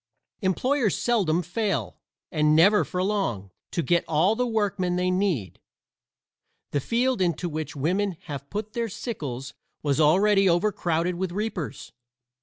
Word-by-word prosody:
Employers 230 +5 +1
seldom 180 -8 +1
fail, 175 - -2 0.3
and 150 0 +3
never 200 +6 +6
for 180 0 -2
long, 120 - -1 0.2
to 170 - -2
get 175 +1 +2
all 165 +7 +3
the 250 +1 0
workmen 200 -5 0
they 180 0 +1
need. 180 - -1 1.1
The 145 - +1
field 240 - 0
into 175 0 0
which 155 -2 -5
women 180 +6 0
have 140 -3 -7
put 210 +1 -5
their 235 -1 -2
sickles 140 - -5 0.3
was 145 0 +1
already 195 +5 +4
overcrowded 175 -2 +1
with 185 -1 -2
reapers. 195 - -4
180 Hz, 135 wpm, -25 LUFS, 155-210 Hz, 1.1 s, never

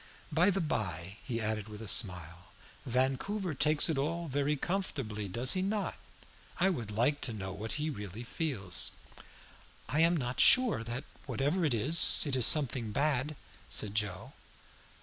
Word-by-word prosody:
"By 170 +5 +3
the 195 0 0
bye," 95 - -4
he 115 -2 -4
added 110 -1 -3
with 105 -1 -10
a 110 - -9
smile, 90 -4 +2 0.4
"Vancouver 135 - -1
takes 150 +2 +3
it 160 -5 -1
all 165 +4 -3
very 145 +1 -1
comfortably, 135 - -4
does 120 +7 +2
he 185 - -1
not? 200 +2 -2 0.7
I 190 +2 +3
would 120 - -5
like 120 +8 0
to 120 - -2
know 95 -3 -6
what 105 +4 -6
he 150 +1 -3
really 105 -2 -8
feels." 120 - -2 1.0
"I 150 - -1
am 165 +1 +3 0.2
sure 250 - +5
that 120 +3 -6 0.2
whatever 150 +7 -1
it 145 -7 +1
is, 145 +10 +7
it 140 -3 -1
is 125 -3 +5
something 130 -7 +1
bad," 145 +3 -1 0.3
said 100 -2 -2
Joe. 105 -3 -3
130 Hz, 155 wpm, -31 LUFS, 105-155 Hz, 1.0 s, is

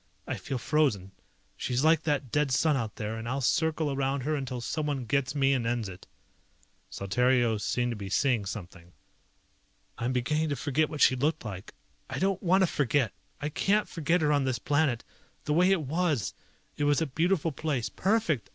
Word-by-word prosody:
I - - -3
feel 135 - -4
frozen. 120 -9 +1 0.4
She's 125 +2 -1
like 160 0 +5
that 145 -5 -1
dead 150 -1 +2
sun 150 +3 +3
out 115 -5 -3
there, 110 +1 -4
and 115 +1 -5
I'll 135 +2 -1
circle 155 +2 +1
around 135 0 -1
her 150 +5 -1
until 135 -4 -3
someone 145 0 -2
gets 135 +3 0
me 135 -1 +3
and 120 -3 0
ends 120 -2 -1
it." 95 -1 -11 0.8
Saltario 120 +3 +1
seemed 120 +3 0
to - - -3
be 100 -2 -6
seeing 120 -1 +1
something. 90 -3 -8 1.1
"I'm 120 +2 -1
beginning 150 +5 0
to 145 - 0
forget 145 +3 0
what 150 - -5
she 130 - +6
looked 145 +1 -1
like. 100 -2 -7 0.3
I - - -4
don't 195 0 0
want 190 +1 +4
to - - +4
forget! 140 -6 +1 0.3
I 145 - -2
can't 200 +7 +1
forget 165 +2 0
her 150 -1 +2
on 145 -1 +2
this 130 -2 0
planet. 140 -1 +1 0.4
The 150 - 0
way 180 +4 +4
it 195 -4 +3
was! 150 - 0 0.4
It 145 - 0
was 145 -1 +3
a 165 - +1
beautiful 165 +3 0
place, 140 -6 -2
perfect! 190 - 0
140 Hz, 190 wpm, -28 LUFS, 120-155 Hz, 1.1 s, she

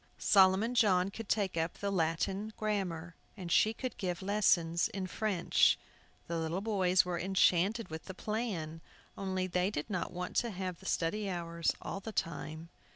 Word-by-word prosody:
Solomon 195 +4 +4
John 195 -5 +3
could 225 0 -8
take 200 -5 +1
up 165 0 -1
the 200 0 -2
Latin 190 +5 -1
grammar, 180 -6 -2 0.2
and 180 -3 -6
she 215 - +5
could 255 +3 -5
give 180 -2 -2
lessons 170 -5 +2
in 195 -1 -4
French. 195 -2 +2 0.5
The 170 0 -2
little 165 +3 -1
boys 190 -4 +3
were 175 -1 -2
enchanted 190 +3 +2
with 160 0 -7
the 190 - -8
plan, 190 -8 -3 0.3
only 190 -1 -2
they 180 +1 0
did 180 +1 -4
not 185 -3 -2
want 180 0 -5
to 235 - +2
have 185 -3 -4
the 190 - -10
study 200 +5 0
hours 170 -2 -1
all - - -4
the 220 +3 -7
time. 160 -2 -4
185 Hz, 165 wpm, -32 LUFS, 170-205 Hz, 0.5 s, she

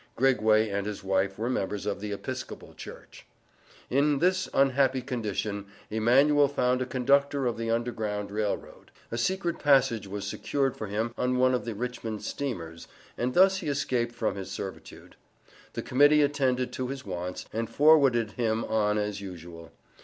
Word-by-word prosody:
Grigway 110 -4 +3
and 100 0 -2
his 105 -2 -5
wife 95 0 0
were 115 +3 -2
members 105 -5 -2
of 100 -1 -2
the 105 +1 -5
Episcopal 100 - -6
Church. - - -12 0.6
In 140 +2 +2
this 185 +4 +1
unhappy 135 -1 +2
condition 105 -5 -3 0.2
Emanuel 135 +7 +4
found 125 -2 +1
a 130 - -2
conductor 140 +2 +2
of 120 - 0
the 115 0 -3
Underground 110 -3 -2
Rail 105 -1 0
Road. - - -16 0.2
A 115 - -2
secret 185 +5 -1
passage 135 -7 +3
was 100 +1 -5
secured 135 +6 -1
for 110 - -5
him 110 +4 -2
on 125 0 +1
one 130 0 +4
of 125 - -1
the 115 -2 -4
Richmond 115 -2 -4
steamers, 85 -12 -5 0.3
and 125 +1 -2
thus 190 +1 +6
he 185 - -5
escaped 125 -4 -1
from 115 -2 -1
his 95 -1 -6
servitude. 95 0 -8 0.6
The - - -4
Committee 145 +3 +5
attended 130 -3 0
to 130 - -3
his 135 -1 -6
wants, 90 -1 -5
and 115 0 -2
forwarded 140 -7 +4
him 115 -1 -1
on 105 -1 +1
as 105 -1 -2
usual. 85 -4 -9
120 Hz, 165 wpm, -28 LUFS, 105-135 Hz, 0.6 s, thus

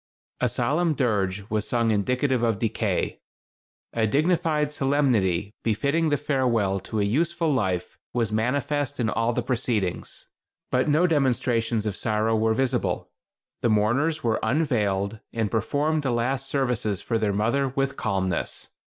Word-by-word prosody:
A - - +2
solemn 160 +2 +1
dirge 105 -6 0
was 105 -1 0
sung 115 -2 +1
indicative 125 +5 +1
of 115 -3 +1
decay. 110 -3 -1 0.7
A 110 -1 +1
dignified 155 +2 +1
solemnity 120 - +1
befitting 140 +9 +1
the 145 - +2
farewell 120 -9 +1
to 105 +3 -4
a - - +2
useful 165 +8 +1
life 95 -8 -1
was 115 -3 0
manifest 140 +5 -1
in 110 -3 +1
all 115 +1 +1
the - - -1
proceedings; 110 -7 -2 0.4
but 130 +4 +2
no 155 +5 +4
demonstrations 120 -7 +1
of 105 -3 -2
sorrow 110 +2 +1
were 110 0 +2
visible. 130 -1 -1 0.5
The 120 - +2
mourners 125 +10 +1
were 115 -2 +1
unveiled, 110 -8 0
and 110 -3 -1
performed 145 +8 0
the 135 - -1
last 125 +3 0
services 125 -7 -1
for 115 - 0
their 105 -2 +1
mother 120 +7 +1
with 135 +1 -1
calmness. 95 -4 -2
120 Hz, 140 wpm, -25 LUFS, 110-140 Hz, 0.7 s, no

